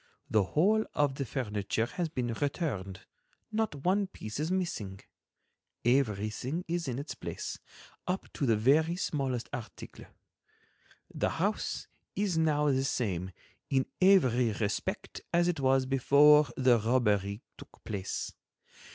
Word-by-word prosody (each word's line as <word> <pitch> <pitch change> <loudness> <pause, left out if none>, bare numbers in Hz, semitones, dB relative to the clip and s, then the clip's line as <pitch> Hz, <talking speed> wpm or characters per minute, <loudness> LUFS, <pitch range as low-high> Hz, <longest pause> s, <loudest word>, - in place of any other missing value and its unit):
The 110 -2 +4
whole 215 +7 +4
of 145 -2 +2
the 135 0 -3
furniture 105 -3 -1
has 165 +7 -3
been 125 -6 -2
returned, 110 - -3 0.5
not 215 -10 -2
one 195 +2 +2
piece 110 - -7
is 155 +2 -1
missing—everything 120 - -3
is 170 -2 -2
in 125 -2 -2
its 145 +3 -5
place, - - -6 0.5
up 185 +1 -1
to 140 - -1
the 115 - +4
very 155 +9 +3
smallest 135 -8 -2
article. 120 -3 -8 1.1
The - - 0
house - - -1 0.3
is 200 -3 0
now 150 -2 +2
the 135 0 +1
same 95 -9 -1 0.4
in 135 -1 +2 0.2
every 125 - +5
respect 105 -1 -3
as 175 0 +3
it 175 -4 0
was 135 -1 +3
before 145 +3 +6
the 125 -3 +4
robbery 105 -3 +1
took - - -15
place. 100 -3 -4
135 Hz, 125 wpm, -30 LUFS, 110-160 Hz, 1.1 s, before